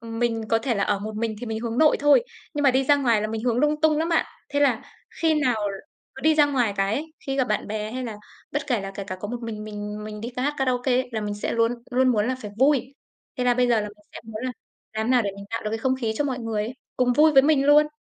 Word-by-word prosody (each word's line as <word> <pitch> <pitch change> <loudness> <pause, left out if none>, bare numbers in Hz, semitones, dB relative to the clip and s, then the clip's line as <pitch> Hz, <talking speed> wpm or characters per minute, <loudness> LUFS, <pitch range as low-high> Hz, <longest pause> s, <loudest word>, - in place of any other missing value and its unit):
ừm, 225 0 -7
mình 230 -2 0
có 225 - +3
thể 235 +1 -1
là 200 - +1
ở 205 - +1
một 215 +1 -6
mình 225 -1 -1
thì 245 - -5
mình 220 0 -3
hướng 235 0 -3
nội 310 -1 +5
thôi, 290 +9 +5 0.3
nhưng 290 - -1
mà 275 - +6
đi 265 +1 +2
ra 285 +1 +5
ngoài 235 -6 +2
là - - 0
mình 220 0 -4
hướng 240 -2 +1
lung 300 +2 +2
tung 310 -1 +3
lắm 325 +2 0
bạn. 330 - +2 0.2
Thế 285 - -1
là 255 -6 +3 0.4
khi 320 -1 +4
nào 250 -5 +2 0.6
cứ - - -9
đi 315 0 +4
ra 295 -1 +5
ngoài 245 -7 +1
cái 195 +2 +1
ấy, 315 +2 -4
khi 270 0 -1
gặp 260 - +3
bạn 210 - -1
bè 215 0 -3
hay 255 +1 -3
là 225 -3 -5 0.4
bất 290 0 -2
kể 245 -7 +1
là 195 - -5
kể 200 - -5
cả 185 -2 -5
có 205 - -4
một 240 +1 -5
mình 215 -2 -5
mình 210 0 -6
mình 210 0 -7
đi 235 +3 -6
ca 250 - -1
hát 290 +2 0
karaoke 255 -1 +1
ấy, 255 0 +1
là 220 - -2
mình 205 -1 -3
sẽ 205 - -3
luôn 230 +1 +2 0.2
luôn 255 +1 +3
muốn 215 -3 +2
là 255 - -1
phải 210 - -6
vui. 270 -1 +2 0.4
Thế 250 - 0
là 245 - +4
bây 250 0 +2
giờ 230 -3 +3
là 210 - -4
mình 210 0 -18
sẽ - - -8
muốn 220 0 -7
là 255 - -2 0.4
làm 220 0 -2
thế 250 - 0
nào 250 -2 +4
để 200 - -1
mình 200 - -9
tạo 230 - -3
được 210 - -1
cái 225 - -2
không 260 +3 +1
khí 225 -2 0
cho 290 - 0
mọi 260 -3 -2
người 225 -3 -2
ấy, 235 +4 -6 0.2
cùng 250 -1 +3
vui 305 +4 +5
với 270 -2 +7
mình 285 -1 +3
luôn, 300 +1 +6
240 Hz, 310 wpm, -24 LUFS, 215-270 Hz, 0.6 s, với